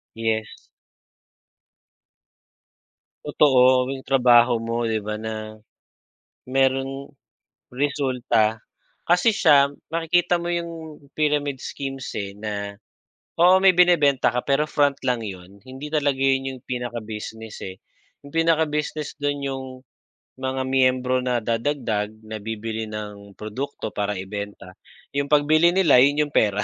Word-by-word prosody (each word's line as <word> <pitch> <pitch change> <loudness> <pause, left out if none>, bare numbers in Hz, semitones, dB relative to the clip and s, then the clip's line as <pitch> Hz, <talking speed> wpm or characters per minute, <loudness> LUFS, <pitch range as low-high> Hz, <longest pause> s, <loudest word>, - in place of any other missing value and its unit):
Yes. 110 -1 -2 2.7
Totoo, 130 -3 +4
yung 135 - -5
trabaho 120 -2 +5
mo, 115 0 -2
'di 110 - 0
ba 105 0 -4
na, 110 -1 -6 0.9
mayrong 135 +1 0 0.6
resulta. 125 -5 0 0.5
Kasi 180 +6 +4
siya 140 -8 +4 0.2
makikita 170 +2 +1
mo 175 0 -2
'yung 165 -3 -5 0.2
pyramid 145 -3 0
schemes 135 -2 -6
eh, 100 -1 -5
na 100 -1 -5 0.6
oo 180 +2 +6
may 195 - +8
binebenta 150 -7 +4
ka 125 - 0
pero 140 +2 +2
front 145 -1 +2
lang 125 -3 0
'yon. 95 -1 -9
Hindi 130 +5 -9
talaga 145 -3 +1
'yon 135 0 +1
'yung 130 -1 -9
pinaka-business, 110 -3 -6
eh. 95 - -8 0.5
'Yung 140 - -13
pinaka-business 155 -2 0
doo'n 145 0 -1
'yung 135 -1 -4 0.8
mga 130 0 -2
miyembro 130 -1 +2
na 125 -1 0
dadagdag, 115 -2 -1 0.2
na 110 0 -6
bibili 110 0 -5
ng 105 -2 -8
produkto 110 +3 -5
para 105 -1 -2
ibenta. 100 -1 -7 0.4
'Yung 140 0 -1
pagbili 155 +3 +5
nila, 165 -9 +5
'yon 145 +3 +3
'yung 145 - -13
pera. 105 -1 +2
130 Hz, 120 wpm, -23 LUFS, 110-145 Hz, 2.7 s, may